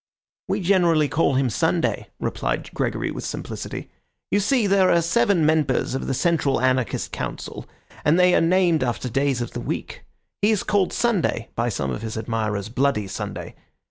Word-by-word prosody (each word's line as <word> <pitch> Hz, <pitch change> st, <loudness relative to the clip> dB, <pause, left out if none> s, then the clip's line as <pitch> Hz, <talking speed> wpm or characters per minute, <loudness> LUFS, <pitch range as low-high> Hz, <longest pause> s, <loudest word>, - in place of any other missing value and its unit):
"We -, -, -1 dB
generally 170 Hz, -5 st, +3 dB
call 145 Hz, -2 st, +1 dB
him 130 Hz, -2 st, +1 dB
Sunday," -, -, 0 dB
replied -, -, -3 dB
Gregory -, -, -1 dB
with -, -, -6 dB
simplicity. -, -, -6 dB, 0.4 s
"You 205 Hz, -, +3 dB
see, 225 Hz, +3 st, +2 dB
there 195 Hz, -2 st, +4 dB
are 170 Hz, -, +5 dB
seven 170 Hz, -1 st, +2 dB
members 155 Hz, -5 st, +1 dB
of 135 Hz, -, -3 dB
the 135 Hz, -, 0 dB
Central 155 Hz, -3 st, +1 dB
Anarchist 130 Hz, -1 st, 0 dB
Council, -, -, -6 dB, 0.4 s
and 155 Hz, +4 st, +4 dB
they 180 Hz, 0 st, +5 dB
are -, -, +4 dB
named 170 Hz, -3 st, +3 dB
after 125 Hz, 0 st, -2 dB
days 135 Hz, 0 st, 0 dB
of 120 Hz, -, -4 dB
the -, -, -5 dB
week. -, -, -5 dB, 0.4 s
He 205 Hz, -, +4 dB
is 215 Hz, -3 st, +1 dB
called 200 Hz, -3 st, +1 dB
Sunday, 190 Hz, -, 0 dB
by 120 Hz, +1 st, 0 dB
some 75 Hz, -, -2 dB
of 65 Hz, -, -4 dB
his 110 Hz, -1 st, -5 dB
admirers 110 Hz, -3 st, -2 dB
Bloody 130 Hz, -4 st, +1 dB
Sunday. 95 Hz, -, -6 dB
150 Hz, 175 wpm, -23 LUFS, 120-180 Hz, 0.4 s, are